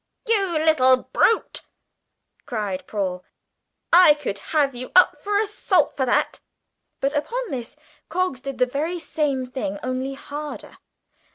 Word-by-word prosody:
"You 395 -7 +1
little 295 -5 +4 0.2
brute!" 455 - +2 0.9
cried 210 -6 -3
Paul, 185 -3 -3 0.7
"I 345 -4 +8
could 260 -9 -4
have 290 -4 +2
you 250 +1 -7
up 365 - +5
for 410 0 0
assault 415 -2 +1
for 265 -2 -1
that!" - - +1 0.6
But 275 +1 0
upon 465 +11 -2
this 245 -4 -5 0.3
Coggs 365 -7 -1
did 275 0 -6
the 250 - +3
very 300 +8 -2
same 290 -5 -2
thing 250 -6 -4
only 255 +2 -3
harder. 295 +2 -8
280 Hz, 130 wpm, -23 LUFS, 255-345 Hz, 0.9 s, I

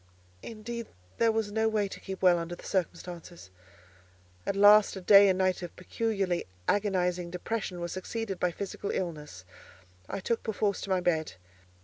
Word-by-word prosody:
Indeed 235 +1 -6 0.3
there 230 -1 +4
was 220 -2 -1
no 220 +1 +2
way 210 -2 +1
to - - -9
keep 190 0 -7
well 180 -2 +6
under 170 +1 -5
the - - -15
circumstances. 175 - -4 1.0
At - - 0
last 205 +1 +7
a 190 - -6
day 200 +1 +8
and 185 - +2
night 185 -1 +1
of 175 - -7
peculiarly 195 -2 -2 0.2
agonizing 180 -4 +1
depression 180 +1 -4
were 170 - -3
succeeded 195 +2 -4
by 180 - +2
physical 200 +3 -5
illness, 150 - -4 0.6
I - - -3
took 230 +4 -1
perforce 205 -2 -1
to - - -6
my 185 -1 +2
bed. 160 - 0
190 Hz, 160 wpm, -29 LUFS, 175-210 Hz, 1.0 s, day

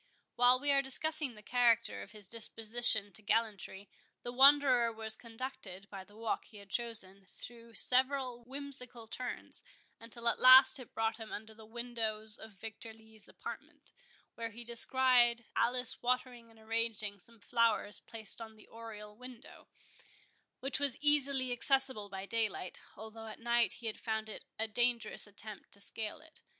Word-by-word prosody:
While 245 +1 +5
we 285 +1 +1
are 275 0 +4
discussing 290 0 0
the 210 - -14
character 235 -1 +1
of - - -12
his 210 -3 -2
disposition 225 -1 +2
to 215 - -3
gallantry, 205 -2 -3 0.4
the 240 - -6
Wanderer 260 -2 +4
was 220 -1 +2
conducted, 225 -5 -9
by 195 -2 -8
the 205 +2 -21
walk 225 -1 -4
he 215 - -15
had 200 -1 -15
chosen, 200 -5 -1
through 230 +1 -14
several 255 -1 +3
whimsical 255 -2 -7
turns, 250 +3 -1 0.4
until 235 +1 -4
at - - +2
last 260 +2 +7
it 250 - -13
brought 225 0 -1
him 225 -1 -10
under 220 +1 -8
the 220 0 -16
windows 220 -2 -5
of 220 -1 -12
Victor 220 +2 -10
Lee's 220 -1 -14
apartment, - - -9 0.4
where 230 0 -6
he 230 +2 -10
descried 240 0 +4
Alice 250 +2 +1
watering 245 -1 -3
and 225 -1 -21
arranging 220 -2 -3
some 230 +5 -20
flowers 230 -2 0
placed 220 -2 -5
on 220 -1 -10
the 215 - -18
oriel 215 -2 -11
window, 250 +1 -14 0.9
which 270 +1 -3
was 285 -3 0
easily 280 -3 +3
accessible 260 -4 +6
by 190 0 -7
daylight, 215 -4 -3 0.2
although 220 +1 -10
at 215 - -10
night 235 0 +1
he 235 - -13
had 220 - -4
found 220 -1 -4
it - - -9
a 220 - -1
dangerous 240 0 0
attempt 205 +1 -7
to 200 - -12
scale 215 +6 -5
it. 320 0 -16
230 Hz, 160 wpm, -32 LUFS, 220-250 Hz, 0.9 s, last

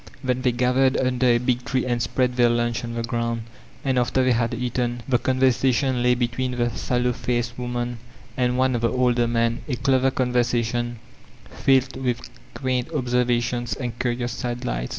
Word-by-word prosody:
Then 130 -1 0
they 125 -1 +2
gathered 125 +2 +2
under 130 -1 +1
a 120 -1 +5
big 125 0 0
tree 130 0 -1
and 120 -1 0
spread 125 +1 0
their 120 -1 +4
lunch 120 0 0
on 115 0 -5
the 115 - -2
ground. 115 0 -2 0.4
And 130 -2 +2
after 125 +2 +1
they 130 - +3
had 115 -1 +1
eaten» 120 0 -2
the 125 -3 +2
conversation 130 0 +2
lay 125 0 +4
between 125 +1 -1
the 120 -1 0
sallow 125 +2 0
faced 120 -1 -2
woman 120 -1 -3 0.4
and 125 -1 +1
one 130 0 +2
of 120 - -1
the 115 - +1
older 125 -2 +2
men, 115 0 0
a 130 - 0
clever 130 +1 +2
con 130 -1 -1
v 125 - +4
ersation 120 0 0 0.6
filled 130 -1 +2
with 120 -2 -2 0.2
quaint 130 +1 -1
observations 120 -3 0
and 120 -2 -5
curious 120 -1 -1
sidelights. 115 - -3
125 Hz, 180 wpm, -23 LUFS, 120-130 Hz, 0.6 s, a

